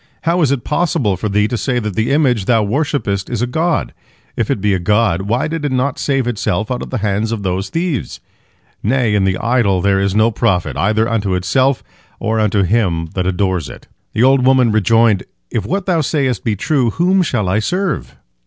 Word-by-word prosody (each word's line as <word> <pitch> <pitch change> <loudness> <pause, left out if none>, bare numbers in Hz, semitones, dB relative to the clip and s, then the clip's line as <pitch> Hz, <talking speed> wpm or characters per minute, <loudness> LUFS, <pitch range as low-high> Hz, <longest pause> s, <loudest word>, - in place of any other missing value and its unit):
How 170 +2 +1
is 145 -4 +3
it 140 -4 -1
possible 150 - 0
for 105 +4 -3
thee 105 +1 +2
to 120 - -3
say 130 -3 -1
that 105 -4 -2
the 110 +1 0
image 130 -8 +2
thou 115 -1 +3
worshippest 105 -5 -1
is 115 - -2
a - - +3
god? 160 +6 -1 0.4
If - - -1
it - - 0
be 105 +1 +1
a 95 - 0
god, 100 -1 +1
why 120 +6 +1
did 160 -1 -4
it 145 - -1
not 130 +2 -1
save 135 -3 0
itself 110 -1 -2
out 125 - -2
of - - -6
the 130 - -2
hands 105 +2 0
of 110 -3 -3
those 95 +1 -2
thieves? 165 -5 -3 0.6
Nay, 120 -1 +1
in 100 -2 +2
the 95 -1 +1
idol 115 -5 +1
there 95 +1 +2
is 100 0 0
no 110 +2 +3
profit, 90 -5 0
either 110 +3 +1
unto 105 -5 -1
itself 130 +9 +1 0.4
or 110 0 -1
unto 105 -2 +2
him 90 -5 0
that 90 -1 -1
adores 95 -3 -1
it." - - -12 0.3
The 110 - +2
old 135 0 +4
woman 130 -3 +4
rejoined, 110 -1 +3 0.3
"If 105 -4 -2
what 195 +2 -2
thou 175 -4 +1
sayest 135 -6 -1
be 110 -3 0
true, 125 +3 +1
whom 180 - +2
shall 120 - -1
I 95 +4 +1
serve?" 180 - -2
115 Hz, 210 wpm, -17 LUFS, 100-135 Hz, 0.6 s, old